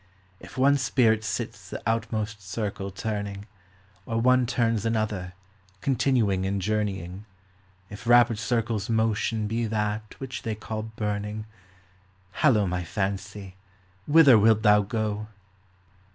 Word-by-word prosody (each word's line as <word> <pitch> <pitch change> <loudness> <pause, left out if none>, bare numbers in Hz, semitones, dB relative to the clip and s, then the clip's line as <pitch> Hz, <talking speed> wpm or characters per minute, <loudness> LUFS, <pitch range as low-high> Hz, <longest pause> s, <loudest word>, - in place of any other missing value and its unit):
If - - -13
one 140 +2 +4
spirit 115 -4 +2
sits 100 -2 -4
the - - -7
outmost 110 -2 -2
circle 100 0 -4
turning, 100 0 -4 0.6
Or 115 0 -1
one 125 +1 +4
turns 115 -3 +1
another, 110 -5 -2 0.5
continuing 115 -7 +1
in 100 +1 -1
journeying, 100 -2 -2 0.6
If 105 +3 -10
rapid 120 -2 +5
circles' 115 -3 -1
motion 110 -1 0
be 115 +2 -1
that 105 0 -2
which 130 -2 -6
they 110 -1 -3
call 110 0 -5
burning! 105 -1 -4 0.9
Hallo, 115 -9 +3
my 90 -1 -2
fancy, 95 +1 -4 0.5
whither 145 -6 +7
wilt 110 0 +4
thou 105 0 +6
go 105 0 -3
110 Hz, 120 wpm, -26 LUFS, 100-115 Hz, 0.9 s, whither